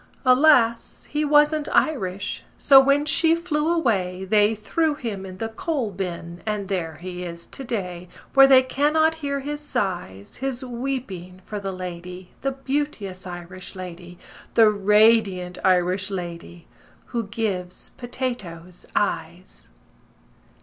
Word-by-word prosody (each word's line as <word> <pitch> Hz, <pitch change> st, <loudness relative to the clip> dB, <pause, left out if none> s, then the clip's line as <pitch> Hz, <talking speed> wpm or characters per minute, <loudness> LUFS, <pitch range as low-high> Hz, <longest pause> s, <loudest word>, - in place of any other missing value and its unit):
Alas, 255 Hz, -3 st, +4 dB
he 300 Hz, +1 st, 0 dB
wasn't 295 Hz, +1 st, +3 dB
Irish. 200 Hz, -9 st, 0 dB, 0.2 s
So 275 Hz, -2 st, +7 dB
when 275 Hz, +2 st, +3 dB
she 325 Hz, +2 st, +3 dB
flew 330 Hz, -2 st, -1 dB
away, 190 Hz, -, 0 dB
They 210 Hz, +2 st, +3 dB
threw 300 Hz, +9 st, 0 dB
him 205 Hz, -8 st, -5 dB
in 185 Hz, 0 st, -9 dB
the 225 Hz, +3 st, -3 dB
coal 250 Hz, -1 st, -2 dB
bin 175 Hz, -2 st, -6 dB
And 210 Hz, -2 st, -3 dB
there 165 Hz, -5 st, -2 dB
he 180 Hz, 0 st, -7 dB
is 170 Hz, -1 st, -7 dB
to 270 Hz, -, -7 dB
day, 180 Hz, -7 st, -4 dB, 0.2 s
Where 270 Hz, 0 st, +8 dB
they 260 Hz, -1 st, +7 dB
cannot 300 Hz, +4 st, +2 dB
hear 280 Hz, -1 st, -2 dB
his 295 Hz, +2 st, -5 dB
sighs 180 Hz, -, -4 dB
His 265 Hz, -1 st, -2 dB
weeping 235 Hz, -8 st, -5 dB
for 210 Hz, -, -5 dB
the 195 Hz, -1 st, -4 dB
lady, 180 Hz, 0 st, -8 dB
The 275 Hz, 0 st, -1 dB
beauteous 265 Hz, -9 st, -3 dB
Irish 180 Hz, +1 st, -8 dB
lady, 175 Hz, -1 st, -9 dB, 0.4 s
The 220 Hz, -2 st, +7 dB
radiant 205 Hz, -3 st, +3 dB
Irish 185 Hz, +1 st, +2 dB
lady 175 Hz, -2 st, -7 dB, 0.5 s
Who 230 Hz, -3 st, -1 dB
gives 190 Hz, -5 st, -4 dB
potatoes 200 Hz, -9 st, -6 dB
eyes." -, -, -3 dB
210 Hz, 130 wpm, -23 LUFS, 180-270 Hz, 0.5 s, Where